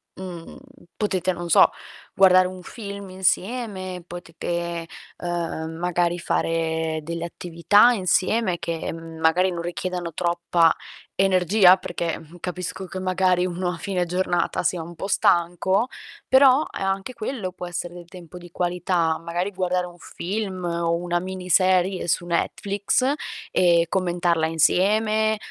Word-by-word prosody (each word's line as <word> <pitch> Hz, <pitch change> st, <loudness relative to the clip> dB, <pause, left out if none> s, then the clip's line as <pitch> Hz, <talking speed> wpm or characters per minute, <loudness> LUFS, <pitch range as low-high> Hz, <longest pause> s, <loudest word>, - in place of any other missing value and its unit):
mhmm, 180 Hz, -3 st, -8 dB, 0.4 s
potete, 185 Hz, -3 st, 0 dB
non 175 Hz, 0 st, -6 dB
so, -, -, +7 dB, 0.4 s
guardare 185 Hz, -1 st, +6 dB
un 185 Hz, 0 st, -9 dB
film 200 Hz, 0 st, -8 dB
insieme, 190 Hz, -1 st, -2 dB
potete, 170 Hz, -1 st, -5 dB, 0.3 s
ehm, 170 Hz, -2 st, -3 dB
magari 175 Hz, 0 st, 0 dB
fare 160 Hz, -1 st, -1 dB
delle 170 Hz, +1 st, -4 dB
attività 175 Hz, +7 st, +3 dB
insieme 190 Hz, 0 st, +1 dB
che 165 Hz, -1 st, -3 dB
m 165 Hz, 0 st, -9 dB
magari 170 Hz, +4 st, +3 dB
non 170 Hz, -1 st, -4 dB
richiedano 175 Hz, 0 st, -4 dB
troppa 170 Hz, -1 st, +2 dB, 0.4 s
energia. 185 Hz, 0 st, +5 dB
Perché, 175 Hz, -2 st, -3 dB
mh, 165 Hz, +2 st, -14 dB
capisco 180 Hz, +1 st, -5 dB
che 185 Hz, +1 st, -6 dB
magari 185 Hz, -1 st, +2 dB
uno 180 Hz, 0 st, -2 dB
a 170 Hz, -, -6 dB
fine 180 Hz, +1 st, -2 dB
giornata 180 Hz, 0 st, 0 dB
sia 175 Hz, -1 st, 0 dB
un 170 Hz, +2 st, -8 dB
po' 165 Hz, -, -5 dB
stanco, 190 Hz, +3 st, +2 dB, 0.4 s
però, 265 Hz, +1 st, +6 dB, 0.2 s
eh, -, -, -7 dB
anche 195 Hz, +5 st, -2 dB
quello 220 Hz, -5 st, -4 dB
può 180 Hz, -, -7 dB
essere 175 Hz, 0 st, -5 dB
del 175 Hz, -1 st, -10 dB
tempo 175 Hz, 0 st, -12 dB
di 175 Hz, -1 st, -12 dB
qualità, 175 Hz, -2 st, 0 dB
magari 175 Hz, +4 st, -3 dB
guardare 180 Hz, -1 st, -1 dB
un 175 Hz, -, -14 dB
film 190 Hz, +1 st, -5 dB
o 170 Hz, 0 st, 0 dB
una 175 Hz, 0 st, -1 dB
miniserie 185 Hz, 0 st, +1 dB
su 175 Hz, -, +1 dB
Netflix, 200 Hz, +8 st, 0 dB, 0.4 s
e 170 Hz, -2 st, +4 dB
commentarla 175 Hz, -3 st, +1 dB
insieme, 215 Hz, +7 st, +2 dB
180 Hz, 135 wpm, -23 LUFS, 170-190 Hz, 0.4 s, so